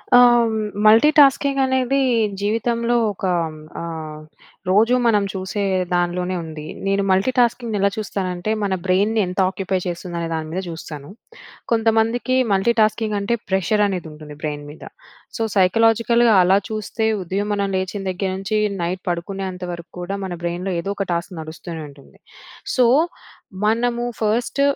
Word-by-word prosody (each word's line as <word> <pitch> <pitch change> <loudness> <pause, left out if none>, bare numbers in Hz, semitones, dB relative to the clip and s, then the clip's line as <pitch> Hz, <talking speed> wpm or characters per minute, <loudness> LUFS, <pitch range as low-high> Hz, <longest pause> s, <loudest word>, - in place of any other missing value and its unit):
ఆ! - - +9 0.7
మల్టీటాస్కింగ్ 275 +4 +5
అనేది 260 +1 +1 0.4
జీవితంలో 230 +3 0 0.2
ఒక 195 - -6 0.5
ఆహ్, 160 -2 -6 0.5
రోజూ 225 +6 +4
మనం 210 -3 +3
చూసే 190 +2 -3 0.3
దానిలోనే 180 +1 0
ఉంది. 155 -1 -8 0.2
నేను 195 0 +1
మల్టీటాస్కింగ్‌ని 235 +2 +1
ఎలా 200 - +3
చూస్తానంటే 190 -2 -3
మన 195 -2 0
బ్రెయిన్‌ని 200 +4 +2
ఎంత 180 +2 -4
ఆక్యుపై 190 -1 -2
చేస్తుందనే 170 -1 -4
దాని 160 -1 -3
మీద 185 - -2
చూస్తాను. 155 -3 -8 0.6
కొంతమందికి 225 +2 +2 0.2
మల్టీటాస్కింగ్ 215 +1 +2
అంటే 200 +4 0
ప్రెషర్ 190 +2 +2
అనేది 180 -4 -4
ఉంటుంది 150 -1 -11
బ్రెయిన్‌ 145 -1 -4
మీద. 150 - -13 0.5
సో, - - -4 0.2
సైకలాజికల్‌గా 225 +4 +4
అలా 190 +2 +4
చూస్తే 220 +1 -2 0.2
ఉదయం 195 +4 -2
మనం 200 -1 -1
లేచిన 190 +2 -3
దగ్గర 190 +1 -2
నుంచి, 195 +2 -2 0.2
నైట్ 180 +2 -3
పడుకునేంత 185 +1 -4
వరకు 170 -1 -10
కూడా 185 +3 -4
మన 185 - -4
బ్రెయిన్‌లో 175 +2 -2
ఏదో 195 - -5
ఒక 195 - -1
టాస్క్ 170 +3 -3
నడుస్తూనే 160 +1 -8
ఉంటుంది. 140 -1 -18 0.6
సో, 255 - +4 0.8
మనము 235 +2 +1 0.2
ఫస్ట్ 225 +5 0
195 Hz, 130 wpm, -21 LUFS, 175-225 Hz, 0.8 s, ఆ